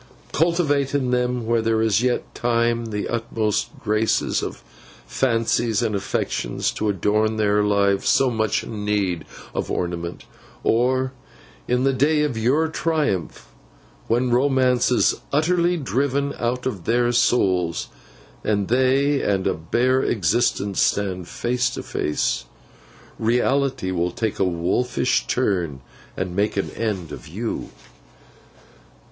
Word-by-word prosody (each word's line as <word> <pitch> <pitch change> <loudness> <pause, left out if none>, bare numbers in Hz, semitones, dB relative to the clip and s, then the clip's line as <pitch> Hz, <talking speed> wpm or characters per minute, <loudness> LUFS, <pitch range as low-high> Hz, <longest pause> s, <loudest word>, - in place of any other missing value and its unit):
Cultivate 145 -4 +1
in 130 -3 0
them, 125 -1 0
while 115 0 +2
there 110 0 +1
is 110 -1 +2
yet 125 0 -1
time, 115 0 +1
the 105 -2 -3
utmost 110 -2 -1
graces 110 +1 +1
of - - -3
the - - -17 0.5
fancies 115 -2 +1
and 110 -2 0
affections, 95 -10 -1
to 110 - -2
adorn 105 +3 +1
their 105 -1 +2
lives 100 -1 +2
so 135 -2 +3
much 110 -1 0
in 105 -3 -6
need 100 -5 0 0.3
of - - -3
ornament; 85 -1 -3 0.4
or, 130 +3 +2 0.6
in 125 +1 +1
the 135 0 +3
day 150 +4 +2
of 145 -5 -1
your 130 +8 +2
triumph, 150 - -2 0.6
when 120 +2 +1
romance 130 -1 +3
is 125 - +3 0.2
utterly 175 +4 +2
driven 140 0 0
out 125 +2 -1
of 105 -10 -3
their 120 +1 +2
souls, 95 -8 +1 0.5
and 100 -2 0
they 135 +3 +3
and 95 -2 0
a - - +2
bare 125 +11 +1
existence 100 -1 +1
stand 95 -3 0
face 125 +4 -1
to - - -6
face, 75 -4 -1 0.7
Reality 125 -1 +1
will 90 -1 0
take 110 +4 -3
a - - +3
wolfish 90 +9 0
turn, 90 - 0 0.4
and 90 -1 -3
make 100 +1 0
an 100 - -1
end 100 -8 -3
of - - -9
you. 110 +9 -4
115 Hz, 130 wpm, -22 LUFS, 100-130 Hz, 0.7 s, so